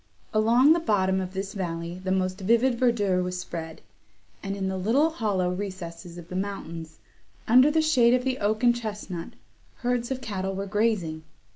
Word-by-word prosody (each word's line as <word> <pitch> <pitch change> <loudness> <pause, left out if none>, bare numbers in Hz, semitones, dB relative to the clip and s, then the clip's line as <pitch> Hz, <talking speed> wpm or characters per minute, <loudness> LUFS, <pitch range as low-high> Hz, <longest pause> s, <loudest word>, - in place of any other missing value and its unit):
Along 235 +7 +5
the 340 - +1
bottom 190 - +1
of 185 0 -6
this 195 +1 -4
valley 170 -1 -4
the 185 - -1
most 185 +1 -1
vivid 235 +6 +3
verdure 205 -7 +2
was 180 0 -3
spread; 160 -2 -6 0.6
and, 195 0 -4
in 195 -1 -2
the 190 - -2
little 265 - +2
hollow 200 - 0
recesses 180 -3 -6
of 170 -1 -10
the 180 - -7
mountains, 170 -5 -5 0.5
under 255 +5 +7
the 315 +1 +2
shade 250 -6 +4
of 250 - 0
the 260 0 -1
oak 215 +3 0
and 240 -1 +5
chestnut, 205 -7 -6 0.4
herds 245 -1 -1
of 265 -1 -2
cattle 195 -5 -3
were 195 +1 -3
grazing. 200 -6 0
200 Hz, 175 wpm, -26 LUFS, 185-235 Hz, 0.6 s, under